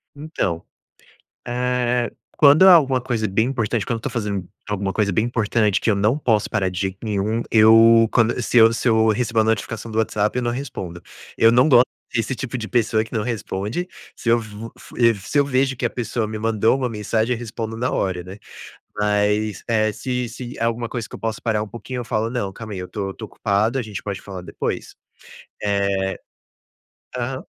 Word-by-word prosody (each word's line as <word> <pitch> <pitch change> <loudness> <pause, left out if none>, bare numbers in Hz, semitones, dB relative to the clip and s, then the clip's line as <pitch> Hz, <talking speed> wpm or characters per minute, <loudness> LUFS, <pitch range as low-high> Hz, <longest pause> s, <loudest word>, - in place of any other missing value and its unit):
Então, 140 - -3 0.8
eh, 125 0 0 0.3
quando 150 +5 +7
há 185 - +10
alguma 135 -5 +3
coisa 120 -4 -1
bem 110 +5 +1
importante, 115 -4 -1
quando 115 - -1
eu - - -11
tô 145 - -3
fazendo 105 -6 -3 0.2
alguma 100 -1 -2
coisa 105 -2 +1
bem 110 +5 +1
importante 110 -3 +1
que - - 0
eu 105 - +3
não 110 +7 +2
posso 110 -8 +1
parar 100 -4 0
de 90 0 -5
jeito 95 -1 -2
nenhum, 105 +1 -1
eu 115 +1 +7
quando 120 +1 +2
se 120 - 0
eu 115 0 +7
se 120 - -1
eu 110 0 +4
recebo 115 +1 +1
uma 110 - +3
notificação 110 +1 -2
do 110 - -4
WhatsApp, 105 0 0
eu - - +1
não 120 -1 0
respondo. 95 -10 -6 0.4
Eu 115 - +6
não 125 +5 +4
gosto 125 -2 +7 0.3
desse 120 +2 -1
tipo 125 0 -4
de 110 - -5
pessoa 110 -2 +1
que - - -14
não 110 -3 0
responde, 115 - -3 0.3
se - - -9
eu 115 - +5
vo 110 +1 -9
fu - - -14
e 115 -2 +4
se 100 +9 -4
eu 140 - +3
vejo 135 -1 +1
que - - -2
a - - +2
pessoa 115 -2 -3
me 110 0 -5
mandou 110 +2 +2
uma 130 -2 -1
mensagem, 110 +2 -1
eu 115 - -4
respondo 115 -1 -5
na 125 +2 0
hora, 90 -2 -1
né, 95 +3 -10 0.6
mas, 105 0 0
eh, 110 -2 +2
se 125 +2 -3
se 120 +2 -8
é - - -2
alguma 115 0 -1
coisa 120 -3 -4
que - - -19
eu - - -10
posso 110 -1 -3
parar 110 -3 0
um 110 - -4
pouquinho, 125 +3 -7
eu 120 - -5
falo: 110 -1 -1
"Não, 120 -6 -2
calma 110 +1 -8
aí, 95 - -5
eu 90 - -6
tô 100 -2 -4
tô 110 - -8
ocupado, 105 +4 0
a - - 0
gente 105 -3 -6
pode 100 -2 -5
falar 95 -2 -8
depois?". 90 - -4 0.7
Eh 100 -1 0 1.0
aham. 125 +2 -3
115 Hz, 210 wpm, -21 LUFS, 105-120 Hz, 1.0 s, há